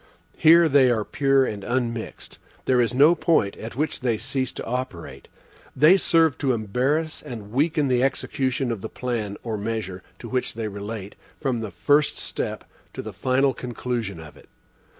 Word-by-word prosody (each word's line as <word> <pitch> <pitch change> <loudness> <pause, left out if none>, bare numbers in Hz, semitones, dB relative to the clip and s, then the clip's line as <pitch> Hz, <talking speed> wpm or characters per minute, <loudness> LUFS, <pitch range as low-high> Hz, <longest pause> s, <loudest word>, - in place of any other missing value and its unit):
Here, 165 +1 +7
they 135 -3 +5
are 110 -3 +1
pure 135 -1 +2
and 105 -5 -5
unmixed. 120 -1 -3 0.3
There 125 -1 +3
is 115 - +1
no 145 +6 +6
point 160 - +1
at 115 +1 -8
which 155 +4 -1
they 120 -3 0
cease 130 +2 -2
to - - -6
operate. 125 -8 -5 0.5
They 155 +7 +7
serve 165 -6 +3
to 135 -2 +1
embarrass 130 +9 -1
and 115 -8 -8
weaken 150 +3 +1
the 125 -1 +2
execution 130 -1 0
of 110 -4 -4
the 110 - -5
plan 115 -5 -3
or 110 -3 -3
measure 105 -4 -4 0.2
to 120 - -9
which 125 -1 -2
they 115 -1 -3
relate, 100 0 -6 0.2
from 130 -5 -1
the 110 -2 -4
first 145 - +2
step - - -4 0.3
to - - -6
the - - -7
final 130 +1 +1
conclusion 120 -6 -4
of 80 -2 -11
it. - - -19
125 Hz, 170 wpm, -24 LUFS, 110-135 Hz, 0.5 s, Here